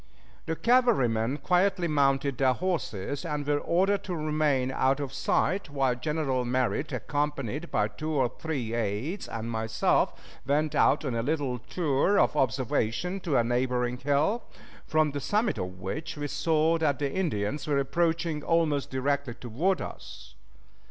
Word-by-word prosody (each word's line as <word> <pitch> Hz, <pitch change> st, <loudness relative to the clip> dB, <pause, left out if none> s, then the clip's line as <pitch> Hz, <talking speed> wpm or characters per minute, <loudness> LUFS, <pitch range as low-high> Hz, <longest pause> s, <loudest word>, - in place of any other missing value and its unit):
The 160 Hz, -, -1 dB
cavalrymen 145 Hz, -, +2 dB
quietly 180 Hz, 0 st, +2 dB
mounted 140 Hz, -3 st, +1 dB
their 130 Hz, -1 st, +4 dB
horses 145 Hz, -, -3 dB
and 150 Hz, -3 st, -3 dB
were 145 Hz, 0 st, +1 dB
ordered 195 Hz, +5 st, +1 dB
to 180 Hz, -, -3 dB
remain 150 Hz, -4 st, +1 dB
out 135 Hz, +1 st, +2 dB
of 140 Hz, -2 st, -4 dB
sight, 175 Hz, +7 st, 0 dB
while 135 Hz, -3 st, +1 dB
General 135 Hz, -1 st, -1 dB
Merritt, 130 Hz, +4 st, 0 dB
accompanied 145 Hz, +1 st, -2 dB
by 105 Hz, -2 st, +1 dB
two 155 Hz, +9 st, -5 dB
or 135 Hz, -5 st, +2 dB
three 135 Hz, -8 st, -3 dB
aids 115 Hz, -, -2 dB
and 115 Hz, 0 st, -5 dB
myself, 110 Hz, 0 st, +1 dB, 0.2 s
went 150 Hz, +2 st, +1 dB
out 150 Hz, -, +3 dB
on 130 Hz, -, -1 dB
a 115 Hz, -, 0 dB
little 140 Hz, -2 st, -1 dB
tour 155 Hz, -, +1 dB
of -, -, +3 dB
observation 130 Hz, -, 0 dB
to 165 Hz, -7 st, 0 dB
a 120 Hz, -, +4 dB
neighboring 125 Hz, 0 st, 0 dB
hill, 145 Hz, -, +1 dB, 0.5 s
from 155 Hz, -1 st, +2 dB
the 145 Hz, 0 st, -4 dB
summit 210 Hz, -, 0 dB
of 90 Hz, 0 st, -5 dB
which 145 Hz, -, -5 dB
we 145 Hz, -, -3 dB
saw 155 Hz, +3 st, +1 dB
that 145 Hz, -4 st, +1 dB
the 140 Hz, -2 st, -2 dB
Indians 145 Hz, -, -1 dB
were 145 Hz, -2 st, +2 dB
approaching 160 Hz, +3 st, 0 dB
almost 155 Hz, -3 st, +1 dB
directly 135 Hz, -1 st, -1 dB
toward 155 Hz, -, -1 dB
us. 60 Hz, 0 st, -9 dB
145 Hz, 150 wpm, -28 LUFS, 125-160 Hz, 0.5 s, their